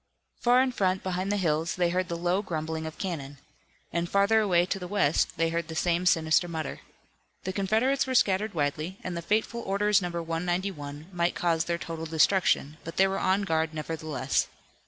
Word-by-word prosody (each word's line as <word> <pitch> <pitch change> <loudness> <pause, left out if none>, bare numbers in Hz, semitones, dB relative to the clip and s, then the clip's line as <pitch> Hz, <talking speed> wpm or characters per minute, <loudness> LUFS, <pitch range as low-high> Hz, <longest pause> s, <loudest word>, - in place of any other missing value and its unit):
Far 245 +1 +5
in 260 - 0
front 190 -5 0
behind 185 +1 -2
the 205 - +1
hills 165 -2 0
they 175 -2 +1
heard 185 +1 0
the 170 - -3
low 175 +3 +1
grumbling 160 -3 -3
of 160 - -8
cannon. 145 -7 -4 0.6
And 170 +1 -1
further 200 +3 +4
away 180 -5 +3
to 195 - -2
the 180 - -6
west 180 -3 +1
they 165 0 +2
heard 165 0 -2
the 160 - -7
same 175 +2 +1
sinister 160 +1 +3
mutter. 160 -3 -4 0.6
The 190 - -3
Confederates 220 +9 +1
were 260 - -1
scattered 205 -2 +2
widely, 155 +5 -2
and 180 -1 -4
the 170 - -3
fateful 220 +5 0
Orders 205 +1 +2
No. 175 - -2
191 170 -2 -3
might 170 0 0
cause 165 -2 +1
their 170 0 -1
total 165 -1 -6
destruction, 160 -2 +2
but 165 - -8
they 195 - +5
were 195 0 -2
on 190 +2 +2
guard, 160 -3 0
nevertheless. 155 -3 -1
175 Hz, 190 wpm, -28 LUFS, 160-195 Hz, 0.6 s, Far